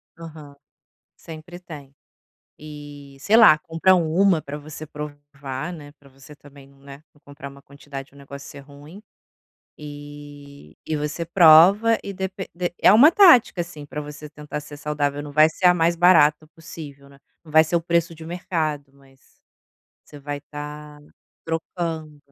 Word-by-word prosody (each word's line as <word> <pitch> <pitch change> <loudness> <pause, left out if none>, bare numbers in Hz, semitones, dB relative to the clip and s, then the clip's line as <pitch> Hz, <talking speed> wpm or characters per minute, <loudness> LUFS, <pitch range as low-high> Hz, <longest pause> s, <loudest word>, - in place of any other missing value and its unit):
Aham. 155 -3 -12 0.6
Sempre 165 +2 -11
tem. 145 -6 -12 0.6
E, 145 -2 -12
sei 210 +7 +2
lá, 215 -10 +7
compra 165 +4 +1
1 175 +1 +2
pra 145 0 -8
você 155 +1 -10
provar, 145 0 -8
né, 145 -4 -11
pra 140 - -20
você 135 +2 -16
também 140 -1 -17
não, 140 0 -23
né, 140 +2 -14
não 145 - -28
comprar 140 -1 -11
uma 140 0 -16
quantidade 140 0 -11
e - - -23
o - - -17
negócio 140 0 -11
ser 140 - -11
ruim. 145 +7 -15 0.8
E 145 - -12
e 155 - -2
você 150 +3 -4
prova, 180 +7 +6
e 200 - -6
depe 190 0 -6
de 175 0 -4
é - - +5
uma 265 +9 +7
tática, 255 - +5
assim, 155 -4 -11
pra 150 +1 -7
você 150 +1 -10
tentar 150 0 -8
ser 150 0 -12
saudável. 145 -1 -3
Não 145 0 -10
vai 155 +2 +5
ser 170 - -10
a 180 - +7
mais 170 0 +1
barata 155 -4 +4
possível, 150 -4 -12
né. 140 0 -19 0.3
Não 160 - -15
vai 160 +1 +5
ser 170 +2 -1
o - - +1
preço 170 0 -1
de 160 - -14
um - - -10
mercado, 155 -5 -4
mas 135 -1 -26 0.6
você 145 - -14
vai 145 0 -6
estar 150 0 -10 0.4
trocando. 165 -2 -5
150 Hz, 170 wpm, -22 LUFS, 145-165 Hz, 0.8 s, lá